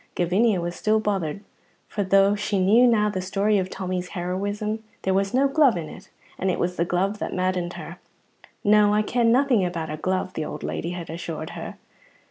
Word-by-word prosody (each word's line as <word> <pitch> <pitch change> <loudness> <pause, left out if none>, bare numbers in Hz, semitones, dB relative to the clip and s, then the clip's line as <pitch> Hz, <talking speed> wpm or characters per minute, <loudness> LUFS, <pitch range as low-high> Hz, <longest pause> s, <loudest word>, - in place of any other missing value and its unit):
Gavinia 190 +4 +2
was 175 0 -3
still 215 +1 +2
bothered, 200 -5 -2 0.5
for 205 - -2
though 195 +1 +4
she 210 0 -1
knew 215 +7 +5
now 215 -3 +3
the 190 -3 -2
story 200 +2 +1
of 185 0 -2
Tommy's 185 -1 -4
heroism, 205 +5 -3 0.2
there 190 - +1
was 195 +1 +1
no 270 +2 +3
glove 275 - +4
in 160 -2 -4
it, - - -12 0.3
and 190 - 0
it 180 - 0
was 180 +1 -1
the 170 - 0
glove 195 +4 -1
that - - -4
maddened 185 -1 -1
her. - - -9 0.6
"No, 210 0 +5
I 215 - +3
ken 235 +1 +2
nothing 250 -4 +3
about 170 -3 -3
a 155 - -4
glove," 185 +3 -2
the 160 - -3
old - - -6
lady 170 - -3
had 170 -2 -6
assured 165 -1 -5
her. - - -7
195 Hz, 200 wpm, -24 LUFS, 180-210 Hz, 0.6 s, knew